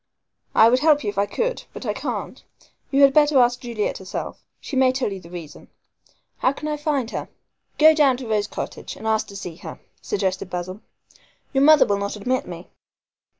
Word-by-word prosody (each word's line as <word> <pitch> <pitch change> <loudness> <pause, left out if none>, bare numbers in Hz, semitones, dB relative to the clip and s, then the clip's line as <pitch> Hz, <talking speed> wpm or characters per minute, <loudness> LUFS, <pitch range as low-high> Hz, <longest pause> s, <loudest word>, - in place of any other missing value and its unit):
"I 220 - +7
would 250 +2 +4
help 300 0 +3
you 205 - -1
if 200 - -4
I 200 - +2
could, 485 - -2
but - - -8
I - - -1
can't. - - -5 0.5
You 280 0 +4
had 275 -1 +6
better 295 -1 +4
ask 245 0 +4
Juliet 235 -4 -3
herself. 190 0 -6 0.2
She 280 - -7
may 260 -1 +4
tell 255 -5 -2
you 195 - -7
the 170 -2 -14
reason." 170 -4 -10 0.7
"How 260 - +2
can 300 - -6
I 300 - -1
find 290 -5 -2
her?" - - -5 0.5
"Go 315 +1 +7
down 285 -5 +3
to 255 -2 -8
Rose 210 -2 0
Cottage - - -6
and - - -11
ask 220 -1 +1
to 200 - -11
see 180 -4 -7
her," - - -9 0.2
suggested 190 - -2
Basil. 185 +3 -5 0.7
"Your 270 0 +3
mother 310 0 +7
will 200 -1 0
not 200 +1 -3
admit 255 +6 -2
me." - - -9
245 Hz, 200 wpm, -22 LUFS, 200-280 Hz, 0.7 s, I